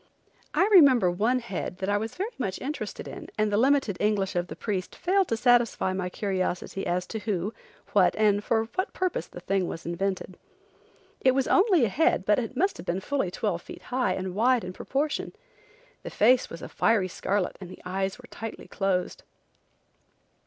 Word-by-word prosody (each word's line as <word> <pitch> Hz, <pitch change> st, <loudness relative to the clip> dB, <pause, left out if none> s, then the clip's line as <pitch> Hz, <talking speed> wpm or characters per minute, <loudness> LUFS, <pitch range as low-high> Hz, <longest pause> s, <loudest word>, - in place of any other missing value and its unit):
I 385 Hz, -, +4 dB
remember 265 Hz, -, +7 dB
one 220 Hz, +8 st, +1 dB
head 200 Hz, -6 st, -4 dB
that 190 Hz, -, -3 dB
I 205 Hz, -, +2 dB
was 220 Hz, +1 st, -5 dB
very 405 Hz, +6 st, -3 dB
much 195 Hz, -7 st, -2 dB
interested 295 Hz, +3 st, -5 dB
in -, -, -8 dB
and 215 Hz, -1 st, +1 dB
the 205 Hz, -, +2 dB
limited 265 Hz, -5 st, +3 dB
English 205 Hz, -3 st, +1 dB
of 175 Hz, 0 st, 0 dB
the -, -, -7 dB
priest 190 Hz, -4 st, -3 dB
failed 380 Hz, +1 st, +2 dB
to 230 Hz, -, -1 dB
satisfy 240 Hz, -5 st, +3 dB
my 185 Hz, -1 st, -2 dB
curiosity 190 Hz, -1 st, -2 dB
as 180 Hz, +1 st, 0 dB
to 220 Hz, -, -5 dB
who, 205 Hz, -1 st, -2 dB, 0.4 s
what, 190 Hz, -3 st, +4 dB
and 205 Hz, -1 st, +3 dB
for 225 Hz, 0 st, +2 dB
what 375 Hz, +2 st, -2 dB
purpose 370 Hz, -1 st, -1 dB
the 175 Hz, -, -11 dB
thing 190 Hz, 0 st, 0 dB
was 165 Hz, -, -6 dB
invented. 185 Hz, +2 st, -3 dB, 0.8 s
It 260 Hz, 0 st, +3 dB
was 270 Hz, -1 st, +1 dB
only 375 Hz, -, +4 dB
a -, -, -1 dB
head 300 Hz, -, +2 dB
but 225 Hz, +4 st, +1 dB
must 385 Hz, +6 st, +1 dB
have -, -, -9 dB
been 175 Hz, +2 st, 0 dB
fully 270 Hz, -1 st, -1 dB
twelve 180 Hz, -2 st, -2 dB
feet -, -, -11 dB
high 250 Hz, -7 st, +2 dB
and 185 Hz, -1 st, -4 dB
wide 240 Hz, +4 st, +3 dB
in 180 Hz, 0 st, -6 dB
proportion. 285 Hz, +9 st, -2 dB, 0.7 s
The -, -, -6 dB
face 245 Hz, +4 st, +3 dB
was 165 Hz, -, -9 dB
a -, -, -5 dB
fiery 215 Hz, -5 st, +2 dB
scarlet 190 Hz, +1 st, -1 dB
and 185 Hz, -, -8 dB
the -, -, -12 dB
eyes 190 Hz, +1 st, -2 dB
were 250 Hz, -, -14 dB
tightly 225 Hz, 0 st, -7 dB
closed. 190 Hz, -2 st, -1 dB
210 Hz, 190 wpm, -27 LUFS, 185-255 Hz, 0.8 s, remember